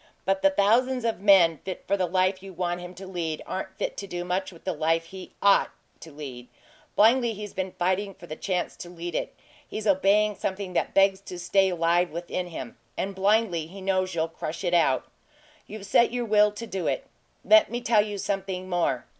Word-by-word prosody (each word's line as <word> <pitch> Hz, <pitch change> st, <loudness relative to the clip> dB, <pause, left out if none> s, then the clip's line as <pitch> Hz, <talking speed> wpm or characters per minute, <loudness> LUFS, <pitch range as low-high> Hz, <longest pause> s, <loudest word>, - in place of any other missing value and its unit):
But 195 Hz, 0 st, +1 dB
the 290 Hz, -, +6 dB
thousands 250 Hz, +1 st, +2 dB
of 225 Hz, -4 st, 0 dB
men 185 Hz, -6 st, +5 dB
fit 185 Hz, -1 st, -7 dB
for 200 Hz, -, +2 dB
the 185 Hz, -2 st, 0 dB
life 185 Hz, +1 st, +1 dB
you 195 Hz, -1 st, -10 dB
want 175 Hz, 0 st, -2 dB
him 180 Hz, +1 st, -9 dB
to 190 Hz, +2 st, -9 dB
lead 170 Hz, -4 st, -4 dB
aren't 190 Hz, -, -5 dB
fit -, -, -3 dB
to 200 Hz, -, -5 dB
do 175 Hz, -1 st, -4 dB
much 185 Hz, +2 st, -2 dB
with 170 Hz, -, -16 dB
the 185 Hz, -, -1 dB
life 165 Hz, +1 st, +1 dB
he 185 Hz, +2 st, -10 dB
OUGHT 200 Hz, 0 st, +5 dB, 0.3 s
to 160 Hz, -, -11 dB
lead. 135 Hz, -4 st, -8 dB, 0.5 s
Blindly, 235 Hz, +2 st, +4 dB
he's 210 Hz, -1 st, -8 dB
been 190 Hz, -1 st, -3 dB
fighting 190 Hz, +2 st, -1 dB
for -, -, -13 dB
the 155 Hz, -, -7 dB
chance 180 Hz, 0 st, -2 dB
to 175 Hz, -, -8 dB
lead 175 Hz, 0 st, -6 dB
it -, -, -3 dB, 0.3 s
he's 215 Hz, -, -5 dB
obeying 205 Hz, +2 st, +3 dB
something 190 Hz, -1 st, -4 dB
that -, -, -1 dB
begs 195 Hz, 0 st, +4 dB
to 185 Hz, -2 st, -8 dB
stay 190 Hz, +2 st, +2 dB
alive 175 Hz, 0 st, +2 dB
within 175 Hz, +2 st, -4 dB
him; 145 Hz, -8 st, -8 dB, 0.2 s
and, 195 Hz, +1 st, -2 dB
blindly, 195 Hz, -4 st, +1 dB
he 195 Hz, +4 st, -11 dB
knows 185 Hz, -1 st, 0 dB
you'll 160 Hz, 0 st, +1 dB
crush 165 Hz, +1 st, -6 dB
it 175 Hz, -1 st, 0 dB
out. 155 Hz, -7 st, +3 dB, 0.6 s
You've 210 Hz, -1 st, -8 dB
set 235 Hz, +4 st, +4 dB
your 245 Hz, 0 st, -2 dB
will 210 Hz, -1 st, +4 dB
to 210 Hz, +3 st, -7 dB
do 190 Hz, -5 st, -3 dB
it. -, -, -1 dB, 0.4 s
Let 325 Hz, 0 st, +6 dB
me 240 Hz, -, -3 dB
tell 230 Hz, -3 st, +3 dB
you 205 Hz, -1 st, -5 dB
something 190 Hz, -2 st, -3 dB
more. 165 Hz, -9 st, 0 dB
190 Hz, 210 wpm, -26 LUFS, 175-200 Hz, 0.6 s, the